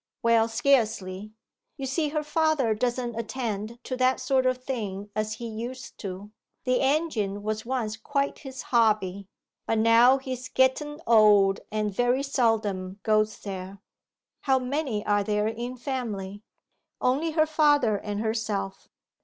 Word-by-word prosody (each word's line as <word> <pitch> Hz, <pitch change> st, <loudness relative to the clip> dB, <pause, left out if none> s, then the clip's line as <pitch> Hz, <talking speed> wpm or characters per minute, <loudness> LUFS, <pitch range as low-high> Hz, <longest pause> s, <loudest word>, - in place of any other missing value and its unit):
'Well, 230 Hz, -1 st, +4 dB
scarcely; 215 Hz, -5 st, 0 dB, 0.5 s
you 275 Hz, -, -4 dB
see 295 Hz, +3 st, 0 dB
her 305 Hz, 0 st, -2 dB
father 300 Hz, -6 st, +1 dB
doesn't 240 Hz, +2 st, -1 dB
attend 225 Hz, -1 st, -4 dB
to 255 Hz, -, -4 dB
that 255 Hz, 0 st, +2 dB
sort 260 Hz, 0 st, +2 dB
of 255 Hz, 0 st, +1 dB
thing 210 Hz, -6 st, -5 dB
as 215 Hz, 0 st, -1 dB
he 235 Hz, -, -7 dB
used 235 Hz, +3 st, -7 dB
to. 195 Hz, +1 st, -7 dB, 0.3 s
The 255 Hz, -1 st, +1 dB
engine 265 Hz, -9 st, 0 dB
was 215 Hz, +1 st, -3 dB
once 230 Hz, -4 st, -2 dB
quite 280 Hz, +4 st, -2 dB
his 265 Hz, -2 st, -8 dB
hobby. 210 Hz, -5 st, +1 dB, 0.4 s
But 225 Hz, -, +1 dB
now 230 Hz, +4 st, +6 dB
he's 255 Hz, -1 st, -6 dB
getten 295 Hz, +4 st, +1 dB
old 210 Hz, -4 st, +5 dB
and 210 Hz, -1 st, -1 dB
very 245 Hz, +5 st, +1 dB
seldom 215 Hz, -8 st, 0 dB
goes 215 Hz, 0 st, +2 dB
there.' 190 Hz, -1 st, -6 dB, 0.6 s
'How 265 Hz, -2 st, +2 dB
many 255 Hz, -4 st, -2 dB
are 205 Hz, 0 st, +2 dB
there 210 Hz, +1 st, 0 dB
in 240 Hz, +3 st, -4 dB
family?' 215 Hz, -7 st, -4 dB, 0.6 s
'Only 295 Hz, +6 st, +1 dB
her 310 Hz, -1 st, +4 dB
father 290 Hz, -7 st, +3 dB
and 205 Hz, +1 st, -4 dB
herself. 215 Hz, -3 st, -3 dB
230 Hz, 140 wpm, -26 LUFS, 210-260 Hz, 0.6 s, now